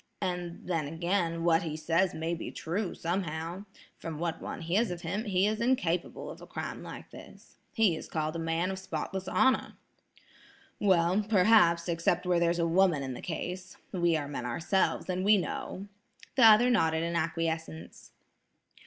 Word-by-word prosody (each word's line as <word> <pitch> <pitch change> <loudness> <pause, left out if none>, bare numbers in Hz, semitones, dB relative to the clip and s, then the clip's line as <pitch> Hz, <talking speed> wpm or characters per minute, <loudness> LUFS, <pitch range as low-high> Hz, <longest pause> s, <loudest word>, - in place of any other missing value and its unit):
And 175 -1 -3
then, 165 -5 -1
again, 170 +1 -1
what 165 -1 +4
he 155 -2 -4
says 170 +4 +1
may 160 +2 -2
be 170 - -5
true, 180 +3 -3
somehow. 170 +1 -3 0.3
From 165 -2 -6
what 170 0 -3
one - - -6
hears 190 +8 +1
of 175 -1 -5
him, 195 +7 -3
he 190 -2 +2
is 215 +2 0
incapable 180 -9 0
of - - -12
a - - -11
crime - - -5
like - - -9
this. - - -14
He 215 -7 +3
is - - -8
called 155 0 -2
a - - -2
man 165 +3 -1
of 190 - -5
spotless 190 0 -4
honor." 260 0 +2 1.0
"Well, 185 0 +3
perhaps, 180 -5 +5
except 170 +1 0
where 180 -1 +2
there's 170 0 +2
a 170 - +1
woman 170 -3 +3
in 130 -1 -4
the - - -8
case. 180 +2 -5
We 175 -3 +2
are 145 -2 -4
men 140 -3 -5
ourselves, 170 +10 0
and 185 0 -1
we 210 +1 +6
know." 190 +1 -4 0.5
The 250 - +6
other 225 +3 +7
nodded 160 -8 +2
in 170 0 -2
acquiescence. 160 -1 -3
170 Hz, 170 wpm, -30 LUFS, 165-190 Hz, 1.0 s, other